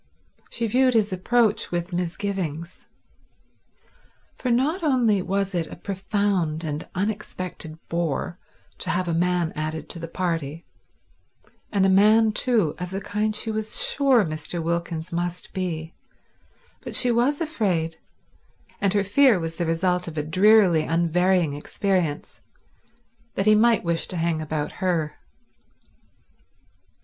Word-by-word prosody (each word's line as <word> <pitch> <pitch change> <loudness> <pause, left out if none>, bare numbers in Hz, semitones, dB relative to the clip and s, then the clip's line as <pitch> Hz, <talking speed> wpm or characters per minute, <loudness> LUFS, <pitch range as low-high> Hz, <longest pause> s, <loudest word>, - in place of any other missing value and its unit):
She 235 - -2
viewed 255 +3 +3
his 210 -3 +2
approach 215 +3 +1
with 175 +1 -3
misgivings. 175 -2 -3 1.5
For 255 - -3
not 275 +10 +1
only 245 - +2
was 195 +1 -1
it 170 -2 -1
a - - -9
profound 190 -5 -1
and 155 +1 -4
unexpected 185 -5 -4
bore 170 +1 -2 0.4
to - - -4
have 180 +1 0
a 170 - 0
man 175 0 +1
added 155 0 -4
to 170 - -5
the 165 - -5
party, 165 -3 -3 1.1
and 195 -2 +2
a - - +4
man, 215 +3 +5
too, 215 - +2
of 180 0 -4
the 190 +1 -3
kind 210 +1 -2
she 220 +1 -2
was 215 0 -1
sure 265 -7 +3
Mr. 155 +2 -4
Wilkins 170 0 -3
must 175 +1 -3
be, 165 -3 -3 0.9
but - - -7
she 250 - +3
was 245 +5 +2
afraid—and 195 - -4
her 200 - +3
fear 225 +1 +4
was 165 0 -4
the 170 - -1
result 180 +2 +1
of 160 -1 -7
a 150 - 0
drearily 185 +1 +5
unvarying 170 0 +2
experience 165 +1 -2 0.9
—that 195 - 0
he 215 - +6
might 230 +2 +4
wish 170 -1 -1
to 180 - -5
hang 165 -1 0
about 155 -1 -3
her. 170 -5 0
180 Hz, 135 wpm, -24 LUFS, 165-210 Hz, 1.5 s, he